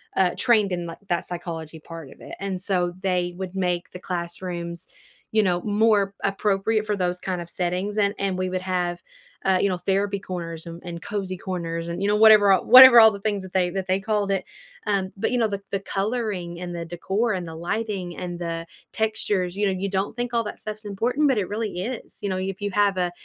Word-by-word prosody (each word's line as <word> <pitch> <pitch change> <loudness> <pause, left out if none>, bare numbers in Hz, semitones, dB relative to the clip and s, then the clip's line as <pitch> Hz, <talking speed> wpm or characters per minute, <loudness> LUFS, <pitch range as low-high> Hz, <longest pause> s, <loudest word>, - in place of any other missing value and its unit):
uh, 185 -2 +3
trained 215 -6 +3
in, 175 -1 -2
like, 165 - -7
that 175 - 0
psychology 165 -2 -6
part 165 -2 -10
of - - -16
it - - -9
and 195 -2 -3
so 180 -3 0
they 180 -2 0
would 190 0 -6
make 180 -2 -1
the 180 - -8
classrooms, 170 -1 -5 0.4
you 215 0 +3
know, 180 -2 +1
more 205 -2 +2
appropriate 205 +2 +1
for 210 - +1
those 180 -1 -1
kind 185 -1 -3
of 170 - -9
settings, 185 +4 -2
and 200 0 +2
and 195 -1 0
we 185 0 -1
would 185 0 -2
have, 180 -2 -1 0.5
uh, 190 -1 +3
you 200 - +2
know, 185 - -1
therapy 200 +2 0
corners 170 -3 -6
and 170 0 -8
and 170 -1 -7
cozy 195 -3 -3
corners 170 -2 -4
and, 170 +2 -4
you 200 - +1
know, 205 - +3
whatever 215 -2 +7
all 190 - +1
whatever 255 0 +11
all 220 -1 +9
the 200 - -7
things 205 -2 -1
that 190 - -11
they 185 -2 +2
that 190 0 -3
they 185 +1 +2
called 205 -1 0
it. 195 - 0 0.4
Um, 195 -2 0
but, - - 0
you 250 - +1
know, 235 - +3
the 200 -2 -4
the 195 - 0
coloring 195 -4 -2
and 175 -1 -5
the 170 - -4
decor 190 +7 -1
and 180 -2 -3
the 165 - -7
lighting 185 0 -3
and 175 -1 -5
the 165 -1 -4 0.3
textures, 210 -4 0
you 205 0 +2
know, 190 -1 -1
you 200 - -1
don't 195 +2 -2
think 240 0 -3
all 230 -1 +2
that 210 - -6
stuff's 215 0 -7
important, 240 +9 +1
but 260 - +2
it 190 - -2
really 210 -4 -3
is. 240 +3 -6
You 200 - -1
know, 185 - -1
if 190 0 -3
you 205 0 -2
have 200 -1 +2
a 180 -1 0
190 Hz, 230 wpm, -24 LUFS, 175-205 Hz, 0.5 s, whatever